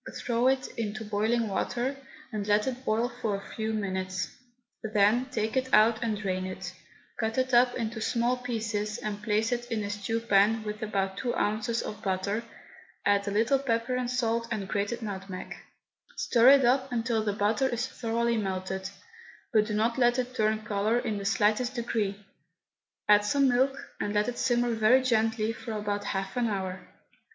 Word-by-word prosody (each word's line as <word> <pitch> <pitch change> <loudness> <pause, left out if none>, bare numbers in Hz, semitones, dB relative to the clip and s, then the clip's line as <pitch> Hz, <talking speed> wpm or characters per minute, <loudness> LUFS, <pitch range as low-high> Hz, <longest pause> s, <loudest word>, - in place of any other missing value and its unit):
Threw 240 +1 +1
it 260 0 +2
into 215 0 -3
boiling 220 +3 +1
water, 245 +6 -1 0.4
and 210 -1 -3
let 210 0 +3
it 260 0 -4
boil 230 0 +1
for 210 -3 0
a 195 - -8
few 220 0 -2
minutes, 190 -3 -2 0.5
then 215 +3 +2
take 220 -3 -2
it 260 0 0
out 220 +1 +5
and 220 -2 -1
drain 185 -2 -2
it; 185 -1 -6 0.5
cut 220 +1 -1
it 260 0 0
up 245 +1 +5
into 225 -1 -3
small 240 +2 +1
pieces 220 -4 -3
and 205 -1 -5
place 215 +2 +1
it 240 0 -2
in 220 -2 -1
a 205 - -3
stew 210 +2 -2
pan 220 0 +3
with 210 0 -5
about 195 -3 -1
two 245 -2 -2
ounces 220 +2 0
of 210 - -7
butter, 195 +3 -1 0.6
add 200 0 +3
a - - 0
little 225 +7 +2
pepper 235 -2 -1
and 250 -1 -1
salt 235 -2 0
and 210 -4 -3
grated 210 +4 -2
nutmeg; 190 -3 -6 0.6
stir 240 +1 +5
it 275 -2 +7
up 260 +2 +2
until 230 -2 0
the 205 -1 0
butter 215 +6 +1
is 240 0 -1
thoroughly 235 -1 -1
melted, 190 -1 -3 0.6
but 215 -1 +4
do 215 - -3
not 230 +4 +1
let 240 0 +4
it 255 0 -2
turn 215 -2 0
colour 210 +2 +1
in 220 -4 -2
the 200 - -6
slightest 220 +5 +2
degree. 225 -4 -1 0.9
Add 210 0 +6
some 275 +6 +3
milk, 265 +2 +2 0.2
and 205 0 -2
let 210 0 +2
it 245 - -3
simmer 240 -2 +2
very 225 +4 +4
gently 225 -2 +1
for 230 0 -7
about 205 -1 -2
half 195 -1 -3
an 240 -1 +2
hour. 190 -3 -4
220 Hz, 180 wpm, -28 LUFS, 205-240 Hz, 0.9 s, it